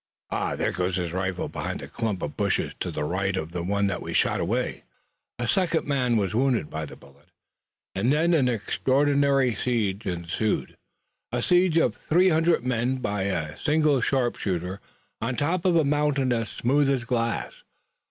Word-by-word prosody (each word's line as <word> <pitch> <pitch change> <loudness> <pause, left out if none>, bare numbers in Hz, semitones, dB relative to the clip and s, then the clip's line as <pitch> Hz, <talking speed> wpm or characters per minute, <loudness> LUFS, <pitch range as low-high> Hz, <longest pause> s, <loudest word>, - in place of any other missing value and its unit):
"Ah, - - -1
there - - 0
goes 90 0 -1
his 90 -3 -2
rifle, 95 0 -2
behind - - -4
the - - -7
clump 110 -5 -3
of 75 - -4
bushes - - 0
to - - -2
the 75 - -3
right 95 +4 -1
of 80 -1 -4
the 85 - -3
one 100 +3 0
that 100 - -1
we - - -5
shot - - +2
away!" - - -1 0.5
A 120 - -2
second 175 0 +1
man 125 -5 +1
was 100 -1 0
wounded 120 - +1
by 80 -1 -4
the 70 - -10
bullet, 70 +1 -20 0.7
and 110 +7 +1
then 165 +4 +3
an 135 -6 +3
extraordinary 135 +3 +2
siege 110 -3 -1
ensued, 90 +4 -2 0.6
a 120 - -1
siege 180 -2 +3
of 125 -9 +3
three 180 +4 +3
hundred 160 -5 +2
men 125 +1 0
by 105 -6 -2
a 80 -5 -2
single 150 -3 +2
sharpshooter 100 -8 -1 0.4
on 120 +3 -1
top 170 +6 0
of 180 -2 +4
a 165 - +5
mountain 140 -3 +1
as 115 -2 -1
smooth 140 +3 +1
as 135 -3 +1
glass. 115 -1 -1
120 Hz, 175 wpm, -26 LUFS, 95-140 Hz, 0.7 s, a